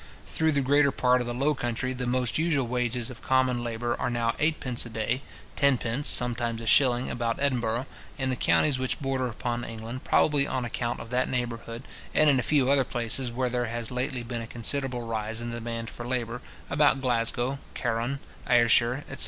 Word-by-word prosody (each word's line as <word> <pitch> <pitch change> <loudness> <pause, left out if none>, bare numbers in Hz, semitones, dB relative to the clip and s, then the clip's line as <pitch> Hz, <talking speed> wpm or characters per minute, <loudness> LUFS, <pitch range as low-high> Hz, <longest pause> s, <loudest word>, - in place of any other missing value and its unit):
Through 160 -1 +1
the 140 - +2
greater 140 +1 +3
part 125 -1 +2
of 120 - -4
the 120 - -2
Low 140 +4 +2
country, 125 0 -2
the 125 -1 -4
most 125 +2 0
usual 155 -5 +1
wages 125 0 -1
of 130 - -12
common 130 -2 +1
labour 120 +1 -2
are - - -1
now 120 -1 0
eight 155 +1 +1
pence 125 -3 0
a 120 - -8
day; 110 +4 -2 0.3
tenpence, 135 -1 +1
sometimes 120 -1 +3
a 115 - -7
shilling, 125 +1 +4
about 115 -1 -2
Edinburgh, 125 -3 0 0.3
in 130 -2 -1
the - - 0
counties 135 +2 +2
which 130 0 -1
border 135 -2 -1
upon 120 +1 -3
England, 115 +3 -7
probably 145 -2 +3
on 130 -2 -2
account 120 0 -3
of 115 - -9
that 125 +1 +1
neighbourhood, 120 -1 -4 0.3
and 155 -1 +5
in 135 - +2
a - - +2
few 135 0 +2
other 140 -1 +4
places 120 +1 -1
where 125 +2 -1
there 125 0 0
has 115 0 -4
lately 125 0 -2
been 120 0 -4
a 115 - -7
considerable 125 +1 +2
rise 110 -1 -3
in 120 0 -4
the 115 - -4
demand 115 0 -5
for 120 +1 -8
labour, 120 -1 -3 0.3
about 145 -2 +3
Glasgow, 125 +1 0 0.2
Carron, 120 +3 -1 0.3
Ayrshire, 120 +2 +4
etc. - - -8
125 Hz, 200 wpm, -27 LUFS, 115-130 Hz, 0.3 s, and